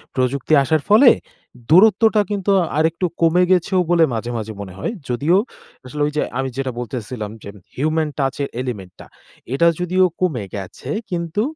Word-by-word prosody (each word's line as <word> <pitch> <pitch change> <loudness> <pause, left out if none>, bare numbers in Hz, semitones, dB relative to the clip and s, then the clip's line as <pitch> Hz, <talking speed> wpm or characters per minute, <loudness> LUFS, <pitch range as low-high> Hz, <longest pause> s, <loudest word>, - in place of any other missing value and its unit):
প্রযুক্তি 130 +3 0
আসার 155 +2 +1
ফলে 230 +5 +7 0.6
দূরত্বটা 215 +5 +5
কিন্তু 200 -1 0 0.3
আরেকটু 160 +3 +1 0.2
কমে 170 +2 +4
গেছেও 185 +1 +2
বলে 170 -2 +5
মাঝে, 115 +1 -3
মাঝে 110 0 -5
মনে 95 -2 -8
হয়। - - -2 0.2
যদিও 145 +9 +2 0.5
আসলে 150 +4 -6
ওইযে 150 0 -2 0.2
আমি 135 0 -1
যেটা 135 -1 -2
বলতেসিলাম 120 -3 -5
যে - - -8 0.3
human 155 +2 0
touch 135 -1 -1
এর 140 - -3
element 105 -8 -6
টা - - -11 0.5
এটা 170 +5 +3
যদিও 185 +1 +2 0.2
কমে 150 - 0
গেছে 95 -2 -8 0.2
কিন্তু 170 +1 -2
150 Hz, 155 wpm, -20 LUFS, 125-180 Hz, 0.6 s, ফলে